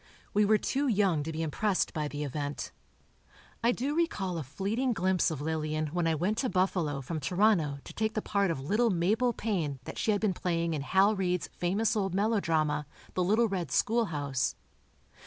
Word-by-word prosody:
We 210 0 +4
were 215 +1 +5
too 275 +6 -1
young 195 - +2
to 160 +2 -4
be 160 +1 -3
impressed 185 +6 0
by 150 -2 -1
the 145 0 -4
event. 145 +1 -4 0.9
I 235 - +5
do 265 +4 -2
recall 195 - 0
a - - -4
fleeting 205 - -1
glimpse 185 -2 +2
of 155 -4 -4
Lillian 155 0 -1
when 175 -2 +1
I 160 - +2
went 185 +8 0
to 260 - 0
Buffalo 180 -7 0
from 155 +5 -4
Toronto 175 -2 +2
to - - -10
take 220 0 -1
the 215 - 0
part 200 -2 +1
of 165 - -1
little 210 - +2
Mabel 210 +7 +2
Payne 185 - -2
that - - -7
she - - -1
had 205 -1 +3
been 210 -3 +1
playing 170 -2 -1
in 150 - -2
Hal 190 +8 +3
Reid's 180 -3 -1
famous 200 +6 +1
old 195 -3 0
melodrama, 160 -9 +1 0.3
"The 185 - +1
Little 215 +6 +3
Red 185 -7 -3
Schoolhouse." 145 - 0
185 Hz, 190 wpm, -30 LUFS, 155-215 Hz, 0.9 s, were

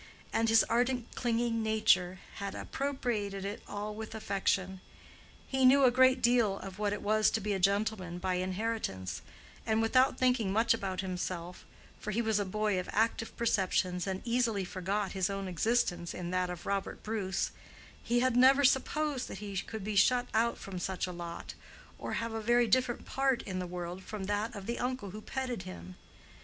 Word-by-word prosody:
And 225 0 +2
his 225 0 +6
ardent 245 0 0
clinging 235 -1 0
nature 215 -4 +3 0.2
had 200 -1 -4
appropriated 225 -8 -2
it 200 +1 -4
all 205 +1 -4
with 220 +1 -7
affection. 190 -3 -1 0.7
He 265 -1 0
knew 270 +2 +7
a 255 - +7
great 260 +1 +4
deal 235 -5 +3
of 195 0 -8
what 210 -1 +1
it 205 - -4
was 215 +1 +3
to - - 0
be 210 0 -1
a 195 - -1
gentleman 200 -2 0
by 185 +1 -1
inheritance, 185 - -3 0.4
and 220 0 +1
without 255 +4 +3
thinking 250 -6 +2
much 225 +3 +4
about 195 -4 -2
himself—for 180 +2 -6
he 210 +2 0
was 220 -2 +1
a 205 - 0
boy 210 0 0
of 180 - -5
active 225 +1 0
perceptions 185 -5 +1
and 190 0 -3
easily 230 -5 +1
forgot 190 +3 -2
his 190 -1 0
own 195 -1 -3
existence 175 -2 0
in 175 -1 -4
that 185 0 0
of 175 -1 -7
Robert 200 -1 -2
Bruce—he 215 +3 -3
had 255 -1 +2
never 265 +3 +6
supposed 275 +1 +2
that - - -7
he 200 0 -6
could 215 +2 -4
be 210 +1 -3
shut 245 +5 +4
out 230 +2 +2
from 190 -2 -6
such 190 +1 -2
a 180 - -5
lot, 170 -1 -7 0.5
or - - -4
have 230 -1 -2
a 225 - -3
very 240 +2 +4
different 245 +2 +1
part 270 -2 +1
in 185 -1 -4
the 180 - -3
world 175 +1 -5
from 200 +1 -6
that 205 +4 -1
of 200 -1 -7
the 235 +2 -3
uncle 250 -5 -2
who 215 +2 -8
petted 255 -3 -3
him. 90 - -9
210 Hz, 180 wpm, -31 LUFS, 190-235 Hz, 0.7 s, knew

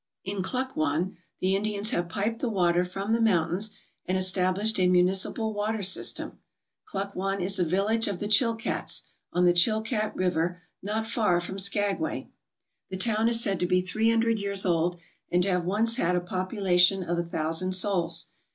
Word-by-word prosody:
In 195 0 -3
Klukwan 190 - -2 0.2
the 190 +1 +2
Indians 210 +2 -1
have 175 -7 -1
piped 210 +6 -2
the 250 - -1
water 175 -4 +2
from 195 +4 -3
the 230 - +1
mountains 185 -1 +1 0.4
and 185 +1 0
established 185 +3 +1
a 180 - +4
municipal 185 +5 +2
water 210 0 -2
system. 190 - -1 0.5
Klukwan 195 0 -3
is 190 +2 0
a - - +3
village 200 +7 +1
of 200 - -2
the 205 - -4
Chilkats, 225 +1 +1 0.3
on 180 0 +2
the 175 - +5
Chilkat 215 +4 +1
River 180 0 -1 0.2
not 215 +3 -2
far 215 -6 +1
from 190 +3 -5
Skagway, 205 +10 -1 0.6
The 190 - -4
town 220 +2 +2
is 230 -1 +2
said 195 -2 -1
to 180 - 0
be 180 0 +2
three 215 +5 0
hundred 230 -1 +2
years 200 -1 -1
old 175 0 +1 0.3
and 180 0 +3
to 195 - 0
have 180 -1 0
once 225 +5 +1
had 180 -5 +1
a - - +2
population 185 0 +1
of 175 0 -2
a - - 0
thousand 165 +2 0
souls. 170 -4 +3
190 Hz, 170 wpm, -27 LUFS, 180-215 Hz, 0.6 s, the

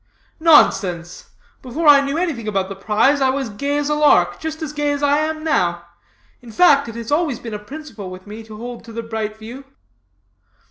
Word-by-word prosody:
"Nonsense! 185 - +3 0.3
before 295 +5 -3
I 285 -1 +8
knew 280 +2 -2
anything 310 -11 -2
about 195 -2 -1
the 195 - -6
prize 220 +8 +2
I 265 - +3
was 265 -3 -2
gay 280 +8 -2
as 290 -1 -1
a 300 - +1
lark, 180 -13 +3
just 315 0 -5
as 300 -2 -5
gay 295 0 -1
as 285 0 -3
I 285 +1 +3
am 310 0 -2
now. 320 - 0 0.6
In 240 -2 -12
fact, 285 -1 +4
it 230 - -9
has 230 +1 -7
always 295 -3 +1
been 230 -2 -8
a 210 - -4
principle 230 -4 -9
with 185 0 -11
me 210 +2 -9
to 215 -1 -11
hold 240 +1 -8
to 230 - -11
the 230 +1 -5
bright 220 -1 -4
view.' 235 +5 -10
260 Hz, 205 wpm, -19 LUFS, 215-295 Hz, 0.6 s, I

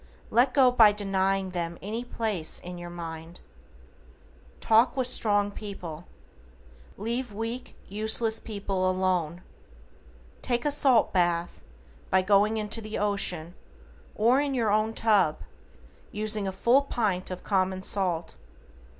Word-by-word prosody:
Let 250 +2 +3
go 260 -3 +5
by 220 -4 +6
denying 195 -1 -1
them 170 -1 -4
any 220 +5 -5
place 220 -9 0
in 180 0 -8
your 175 0 -8
mind. 165 -1 -8 1.2
TALK 225 +4 +3
WITH 260 - +1
STRONG 205 -4 +2
PEOPLE. 180 -6 -8 0.9
Leave 235 +3 -3
weak, 225 +4 -6
useless 220 +2 0
people 195 -3 -2
alone. 180 -2 -1 1.0
Take 240 +1 -1
a 295 - +2
salt 270 -5 +3
bath, 175 -1 0 0.5
by 190 0 +3
going 205 +3 +3
into 215 +1 -3
the 215 0 -6
ocean, 180 -5 0 0.6
or 240 +6 +3
in 285 -2 -2
your 225 -4 +1
own 215 +1 +1
tub, 205 -8 +2 0.7
using 210 -1 0
a - - -2
full 235 +8 +3
pint 210 -9 -2
of 185 -1 -7
common 185 -1 -1
salt. 175 - -2
205 Hz, 125 wpm, -27 LUFS, 185-225 Hz, 1.2 s, by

